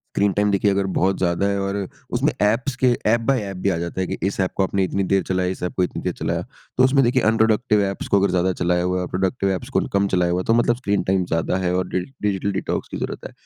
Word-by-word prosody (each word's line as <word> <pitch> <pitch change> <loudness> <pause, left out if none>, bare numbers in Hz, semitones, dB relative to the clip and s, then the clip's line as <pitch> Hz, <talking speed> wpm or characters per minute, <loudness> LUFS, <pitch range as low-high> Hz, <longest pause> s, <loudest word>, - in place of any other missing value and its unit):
Screen 100 0 +2
time 105 +1 +1
देखिए 100 +1 +2
अगर 100 0 +1
बहुत 95 +1 +2
ज़्यादा 90 +2 +1
है 100 0 0
और 100 0 -2 0.4
उसमें - - +1
ऐप्स 115 +6 +1
के 130 - +1 0.2
ऐप 115 +1 +3
बाय 135 -3 +3
ऐप 100 -2 -6
भी - - +5
आ 90 - 0
जाता 85 +2 -4
है 95 - 0
कि - - -4
इस 100 - -2
ऐप 95 - +1
को - - +2
आपने 95 0 +1
इतनी 95 +1 -1
देर 95 -1 +3
चलाया 90 -1 0
इस 95 - -6
ऐप 90 - -3
को 90 - +2
इतनी 90 - -3
देर - - -1
चलाया। - - -2 0.3
तो 130 - +5
उसमें 135 +1 +4
देखिए 125 +1 +2
अनप्रोडक्टिव 110 -1 +2
ऐप्स 100 0 -4
को 100 - +4
अगर 100 0 +2
ज़्यादा 90 +1 +1
चलाया 90 0 +2
हुआ 90 +1 0
है 90 - -2
प्रोडक्टिव 95 +2 0
ऐप्स 95 -2 -3
को - - +5
कम 100 0 +2
चलाया 90 -1 +2
हुआ 90 - 0
है - - -4
तो 115 - +3
मतलब 120 0 +3
स्क्रीन 100 -5 0
टाइम 95 0 +1
ज़्यादा 80 +2 0
है 90 0 +1
और 90 0 -1
डि 95 - -1 0.2
डिजिटल 100 -1 0
डिटॉक्स 95 - -3
की - - -6
ज़रूरत - - -5
है। - - -10
95 Hz, 280 wpm, -22 LUFS, 90-105 Hz, 0.4 s, भी